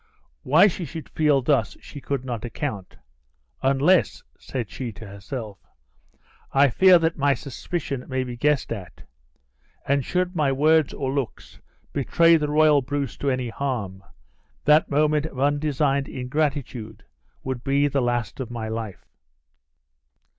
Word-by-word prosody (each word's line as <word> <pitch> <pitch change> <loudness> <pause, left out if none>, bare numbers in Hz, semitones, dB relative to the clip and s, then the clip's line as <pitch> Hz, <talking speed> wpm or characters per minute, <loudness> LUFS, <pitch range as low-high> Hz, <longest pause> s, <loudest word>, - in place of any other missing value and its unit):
Why 160 +8 +5
she 190 -2 0
should 160 -1 -8
feel 150 -4 +2
thus 125 -6 +1
she 145 - -11
could 135 -2 -3
not 120 -4 -4
account, 115 -5 -5 0.6
"unless," 140 +7 +2 0.2
said 125 -5 -4
she 125 -3 -5
to 105 +3 -11
herself, 100 +1 -7 0.9
"I 140 +1 +5
fear 185 +7 +7
that 165 -1 -1
my 140 0 +3
suspicion 140 -1 -5
may 130 -1 -1
be 125 -1 -6
guessed 145 +3 +1
at; 100 -6 -7 0.8
and 140 0 +2
should 180 +5 -1
my 150 -4 +2
words 155 +2 +3
or 135 -1 -3
looks 140 -4 -5 0.3
betray 165 +7 +4
the 150 -2 0
royal 150 -1 +4
Bruce 140 0 -3
to 140 - -1
any 130 -2 -1
harm, 110 -8 -4 0.6
that 150 +1 +5
moment 150 +1 +2
of 135 - -9
undesigned 145 -1 +1
ingratitude 125 -6 -3 0.4
would 130 -2 -4
be 140 +1 +2
the 140 -1 0
last 120 -2 -2
of 130 -3 -4
my 115 -2 -5
life." 110 -3 -6
135 Hz, 140 wpm, -24 LUFS, 120-150 Hz, 0.9 s, fear